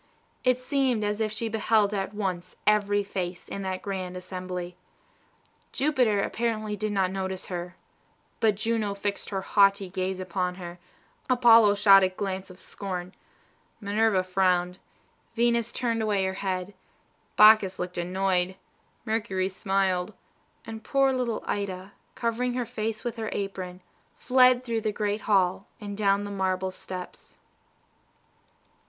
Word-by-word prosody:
It 255 -1 +3
seemed 255 -3 0
as 210 +1 -1
if 215 -1 0
she 225 +2 -3
beheld 215 -1 +2
at 195 -1 -2
once 185 -4 -4
every 205 -1 +3
face 180 -3 -5
in 200 - -5
that 190 -1 -4
grand 185 -2 -4
assembly. 180 -1 -6 1.0
Jupiter 255 -8 +2
apparently 215 -2 -2
did 215 +1 -2
not 190 -2 +1
notice 190 -1 -4
her; 175 0 -5 0.6
but 215 -2 +3
Juno 215 -1 -1
fixed 200 0 -3
her 195 -2 -3
haughty 195 -1 +3
gaze 185 0 -2
upon 180 0 -2
her, 175 -1 -9 0.5
Apollo 230 -4 +6
shot 200 -1 +7
a 190 - +3
glance 190 0 -4
of 185 - -13
scorn, 185 -2 -6 0.7
Minerva 205 -2 +2
frowned, 185 -1 +1 0.6
Venus 235 -1 +2
turned 230 -2 -1
away 205 -3 +1
her 190 - -1
head, 190 0 -3 0.6
Bacchus 210 -3 +7
looked 180 0 -4
annoyed, 185 +1 0 0.5
Mercury 210 -4 -1
smiled, 190 0 -1 0.5
and 220 -1 -8
poor 275 +1 +2
little 245 -3 -2
Ida, 195 -1 -3 0.2
covering 245 +1 -1
her 250 -1 -1
face 220 0 -4
with 240 -1 -4
her 220 -1 -3
apron, 185 -2 -5 0.3
fled 255 0 +4
through 230 -3 -2
the 215 - -1
Golden 210 0 -1
Hall, 195 -1 +1
and 205 -2 -6
down 200 -1 +2
the 205 - -6
marble 190 -1 -1
steps. 185 -1 -9
200 Hz, 135 wpm, -27 LUFS, 185-220 Hz, 1.0 s, shot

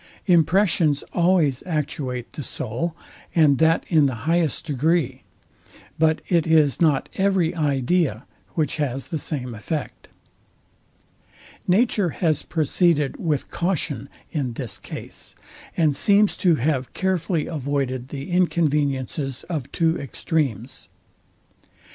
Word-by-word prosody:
Impressions 170 -3 +3
always 170 -7 +3
actuate 135 -6 -3
the - - -6
soul, 130 +6 -4 0.4
and 150 -5 +5
that 160 0 +3
in 155 -4 +4
the 130 - -2
highest 165 -1 +1
degree; 145 -2 0 0.8
but 160 0 +2
it 170 -3 +2
is 155 -3 +3
not 150 -5 +3
every 190 -4 +2
idea 145 -3 0 0.3
which 155 -4 0
has 135 -3 -2
the 160 - -2
same 125 -5 -4
effect. 145 +8 -5 1.6
Nature 205 -1 +3
has 155 -2 0
proceeded 160 -2 +1
with 150 -5 -2
caution 170 -6 -2 0.2
in 135 -6 -2
this 115 -4 -5
came, - - -8 0.7
and 155 -4 +3
seems 200 +7 +4
to 175 -3 +3
have 135 -2 -1
carefully 180 -4 0
avoided 135 -4 -2
the 140 +4 -7
inconveniences 145 -6 0
of 140 -5 -3
two 165 -1 +1
extremes. 135 - -3
155 Hz, 110 wpm, -23 LUFS, 135-170 Hz, 1.6 s, and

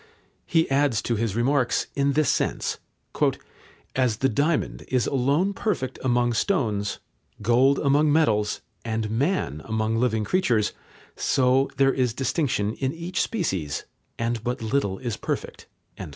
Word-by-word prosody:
He 165 -1 +3
adds 135 -5 +3
to 120 - 0
his 110 -2 -1
remarks 125 +1 +1
in 140 0 +1
this 155 +1 +2
sense: - - -1 1.2
"As 125 -5 +1
the 135 - +2
diamond 145 +7 0
is 125 -2 +1
alone 140 +9 +1
perfect 170 - -2
among 120 -1 +2
stones, 110 - 0 0.5
gold 125 +5 +4
among 145 +1 +3
metals, 110 -10 +2 0.2
and 110 -2 -2
man 115 - 0
among 110 0 -1
living 115 -2 +1
creatures, 120 - +1 0.4
so 130 +1 +2
there 135 -1 +4
is 125 -3 0
distinction 130 -5 0
in 130 +2 -2
each 170 +3 -2
species, 95 - -2 0.3
and 115 -1 -2
but 120 -1 -3
little 110 -5 0
is 120 -2 -4
perfect." - - -4
125 Hz, 135 wpm, -25 LUFS, 110-140 Hz, 1.2 s, gold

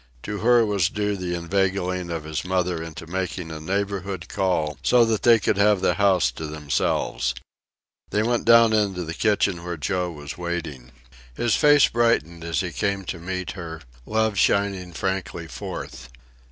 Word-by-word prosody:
To 105 0 -4
her 120 0 +4
was 100 -4 +1
due 105 -1 -1
the 90 -2 -3
inveigling 90 0 -1
of 85 -2 -4
his 75 -1 -4
mother 90 -2 -1
into 80 0 -8
making 90 -1 -4
a 80 - -6
neighborhood 95 +1 -3
call 90 -7 -1
so 120 -1 +5
that 110 -2 0
they 120 -1 +6
could 100 - 0
have 105 0 +4
the 95 - +2
house 95 - +3
to 80 +5 -6
themselves. 70 -4 -1 0.7
They 105 - +1
went 120 +1 0
down 115 -1 +6
into 100 -4 +1
the 80 0 -5
kitchen 100 -2 +1
where 85 -1 -4
Joe 90 +4 -1
was 75 -1 -8
waiting. 80 -8 -5 0.4
His 120 - +1
face 145 -2 +6
brightened 110 -9 +1
as 85 +2 -1
he 90 -2 -4
came 100 +2 -1
to 85 - -5
meet 90 0 -4
her, 80 -3 -7 0.3
love 110 -2 +1
shining 100 -3 +1
frankly 95 -1 -3
forth. 65 -2 -7
90 Hz, 165 wpm, -24 LUFS, 85-100 Hz, 0.7 s, they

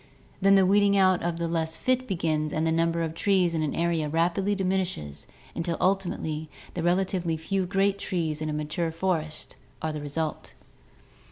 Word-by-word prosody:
Then 195 +1 +6
the 190 -1 +5
weeding 200 +1 +4
out 185 -2 +4
of 170 -1 -1
the 170 0 -1
less 165 -1 -1
fit 255 0 0
begins 155 -5 0
and 155 +1 0
the 160 - +2
number 165 +1 +1
of 160 -1 -3
trees 180 -1 +2
in 160 - 0
the 155 - -2
area 165 -3 +1
rapidly 175 +6 +1
diminishes 185 - -2 0.3
until 170 0 -2
ul 190 +2 +4
timately 160 -5 -4 0.3
the 175 - -3
relatively 175 -1 +1
few 185 +3 -1
great 195 +1 +1
trees 160 -6 -2
in 155 - -2
a - - -2
mature 155 +3 -2
forest 165 -2 -3 0.2
are 160 0 -2
the 150 - -5
result. 150 +2 -4
170 Hz, 180 wpm, -27 LUFS, 160-190 Hz, 0.3 s, Then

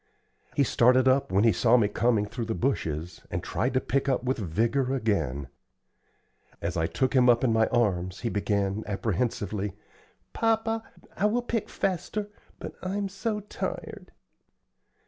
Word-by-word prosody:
He 140 - +4
started 125 +1 +4
up 130 -5 +3
when 100 +2 +3
he 115 - +6
saw 115 +6 +4
me 110 -4 +3
coming 110 0 +1
through 115 +3 -5
the 110 0 -2
bushes, 85 - -2
and - - -3
tried 130 +3 -1
to - - +5
pick 135 +3 -1 0.2
with 130 0 -1
vigor 115 - 0
again. 95 - -1 1.1
As - - -3
I 80 - +1
took 130 +10 0
him 125 -2 +5
up 120 +1 +4
in 120 -3 +3
my 110 0 +3
arms, 95 -7 0
he 120 - -1
began, 100 0 0
apprehensively, 105 -1 -2 0.6
"Papa, 225 0 +1 0.3
I 210 - +2
will 240 +3 0
pick 230 -3 -2
faster, 195 +3 -2 0.3
but - - -7
I'm 195 +2 -2
so 210 +2 -3
tired!" 210 - -6
120 Hz, 150 wpm, -27 LUFS, 100-140 Hz, 1.1 s, he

